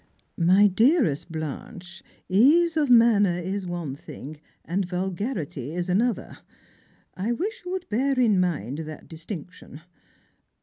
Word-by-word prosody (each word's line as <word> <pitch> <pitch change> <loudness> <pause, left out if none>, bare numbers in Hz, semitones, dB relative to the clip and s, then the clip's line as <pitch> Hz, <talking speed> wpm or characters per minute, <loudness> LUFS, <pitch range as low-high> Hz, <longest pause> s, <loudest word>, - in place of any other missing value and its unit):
" - - -46 0.2
My 205 +1 +6
dearest 210 - +2
Blanche, 175 - -7 0.3
ease 310 - +4
of 300 -4 +1
manner 220 -7 +5
is 190 +2 -4
one 170 -6 -4
thing, 145 +1 -10 0.2
and 185 +4 -1
vul 180 +1 -2
garity 170 - -4
is 175 +1 -3
another; 215 +3 0 0.8
I 210 +6 -1
wish 430 - -4
you 360 - -5
would 375 -1 -4
bear 260 +4 0
in 215 -6 +4
mind 150 - -1
that 155 -1 -8
distinc 165 +1 -8
tion. 155 -4 -13
190 Hz, 140 wpm, -25 LUFS, 165-235 Hz, 0.8 s, My